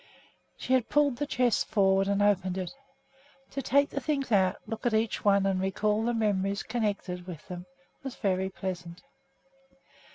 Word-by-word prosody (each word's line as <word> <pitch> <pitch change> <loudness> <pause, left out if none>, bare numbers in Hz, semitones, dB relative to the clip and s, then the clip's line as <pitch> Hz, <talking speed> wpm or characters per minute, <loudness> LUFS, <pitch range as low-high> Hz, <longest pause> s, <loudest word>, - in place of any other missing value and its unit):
She 260 - -1
had 255 -3 +2
pulled 290 -4 +3
the 290 - -2
chest 245 -5 +1
forward 195 -1 +3
and 200 0 +2
opened 190 -2 +2
it. 185 -2 -4 0.8
To 275 - -3
take 280 +3 +3
the 280 - -3
things 275 -2 -1
out, 190 -2 +4
look 225 - -6
at 225 - +1
each 220 +1 0
one, 200 -1 +4
and 190 -1 +1
recall 210 +3 0
the 240 - +1
memories 200 -3 0
connected 200 -6 -2
with 165 -4 -8
them 180 0 -7 0.3
was 270 -2 -6
very 190 -2 0
pleasant. 180 -1 -6
200 Hz, 165 wpm, -29 LUFS, 190-240 Hz, 0.8 s, out